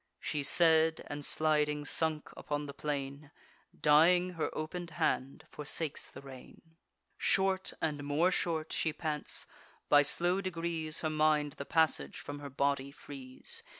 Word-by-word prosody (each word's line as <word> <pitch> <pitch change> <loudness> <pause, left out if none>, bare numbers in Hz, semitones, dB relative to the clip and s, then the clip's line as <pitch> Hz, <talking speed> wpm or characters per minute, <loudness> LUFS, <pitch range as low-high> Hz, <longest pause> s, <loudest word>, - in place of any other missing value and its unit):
She 150 - -2
said, 160 +2 +4
and, 145 0 -5
sliding, 150 -1 +1
sunk 155 0 0
upon 145 0 -4
the 140 - -7
plain: 140 -1 -4 0.5
Dying, 175 +4 +5
her 165 -3 -2
open'd 170 +3 -5
hand 135 +2 -1
forsakes 150 +1 -2
the - - -11
rein; 140 +5 -14 0.4
Short, 190 -1 +2
and 150 -2 -1
more 150 +6 +2
short, 160 -3 -1
she 160 - 0
pants; 150 -1 -1 0.4
by 145 - +7
slow 175 +6 +3
degrees 165 -4 -1
Her 155 - -1
mind 155 -1 +2
the 140 - -7
passage 160 0 +1
from 145 0 -7
her 145 -1 -7
body 140 0 0
frees. 135 -2 -6
155 Hz, 140 wpm, -32 LUFS, 145-165 Hz, 0.5 s, by